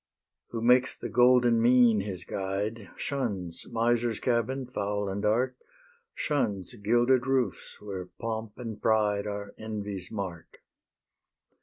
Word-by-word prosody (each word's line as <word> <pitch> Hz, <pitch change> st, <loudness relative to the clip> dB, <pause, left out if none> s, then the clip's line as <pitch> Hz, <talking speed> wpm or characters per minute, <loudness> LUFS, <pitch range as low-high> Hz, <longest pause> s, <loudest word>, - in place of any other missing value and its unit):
Who 115 Hz, -1 st, -5 dB
makes 125 Hz, +2 st, +4 dB
the -, -, -5 dB
golden 120 Hz, -1 st, +5 dB
mean 120 Hz, -2 st, +5 dB
his 95 Hz, -3 st, -4 dB
guide, 100 Hz, +4 st, -3 dB
Shuns 100 Hz, -12 st, -3 dB
miser's 115 Hz, -1 st, +1 dB
cabin, 125 Hz, +2 st, 0 dB
foul 105 Hz, -4 st, -2 dB
and 95 Hz, +1 st, -3 dB
dark, 120 Hz, +5 st, +1 dB, 0.6 s
Shuns 110 Hz, -9 st, -1 dB
gilded 120 Hz, +4 st, +2 dB
roofs, 130 Hz, -2 st, -1 dB
where 95 Hz, -3 st, -6 dB
pomp 110 Hz, +1 st, -5 dB
and 115 Hz, -4 st, -6 dB
pride 105 Hz, -2 st, +2 dB
Are 100 Hz, 0 st, -5 dB
envy's 105 Hz, -4 st, -5 dB
mark. 95 Hz, -6 st, -6 dB
110 Hz, 120 wpm, -28 LUFS, 100-120 Hz, 0.6 s, golden